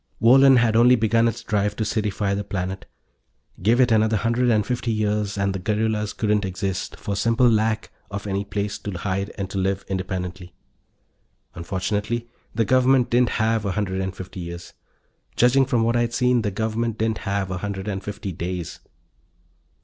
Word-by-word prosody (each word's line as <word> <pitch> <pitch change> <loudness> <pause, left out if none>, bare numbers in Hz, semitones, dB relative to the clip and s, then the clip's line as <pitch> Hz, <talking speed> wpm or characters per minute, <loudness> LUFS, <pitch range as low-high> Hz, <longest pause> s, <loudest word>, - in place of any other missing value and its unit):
Wohlen 135 +3 +7
had 115 -2 +3
only 120 +2 +6
begun 115 0 +2
its 115 +1 -3
drive 105 -2 0
to 110 - -2
citify 105 -2 -1
the 100 - -2
planet. 95 -1 -4 0.7
Give 115 +6 +3
it 125 -2 +4
another 110 0 +3
hundred 115 +4 +1
and 105 -3 +2
fifty 125 -1 -2
years 105 -1 -1
and 100 -1 0
the 95 - -3
guerrillas 105 +1 -1
couldn't 105 -1 +1
exist, 95 0 -3
for 100 - -3
simple 115 +4 +3
lack 110 -1 +1 0.2
of 100 0 -6
any 100 0 -1
place 100 0 -3
to 105 - -5
hide 95 +2 -2
and 100 -2 -3
to 100 - -2
live 95 +1 -1
independently. 95 -1 -4 1.0
Unfortunately, 105 +7 -3 0.3
the 115 0 +2
Government 130 +2 +3
didn't 120 0 +2
have 110 -1 +1
a 100 -3 -1
hundred 95 -2 -2
and 95 0 -4
fifty 95 0 -8
years. 85 0 -8 0.6
Judging 130 +2 +4
from 120 -5 +1
what 115 +1 +1
I'd 120 0 0
seen, 125 -1 +3
the 105 - -1
Government 110 +2 -2
didn't 110 -1 -1
have 100 -2 -2
a 90 - -3
hundred 100 0 -5
and 100 -2 -3
fifty 100 -1 -5
days. 90 0 -5
105 Hz, 175 wpm, -23 LUFS, 95-115 Hz, 1.0 s, Wohlen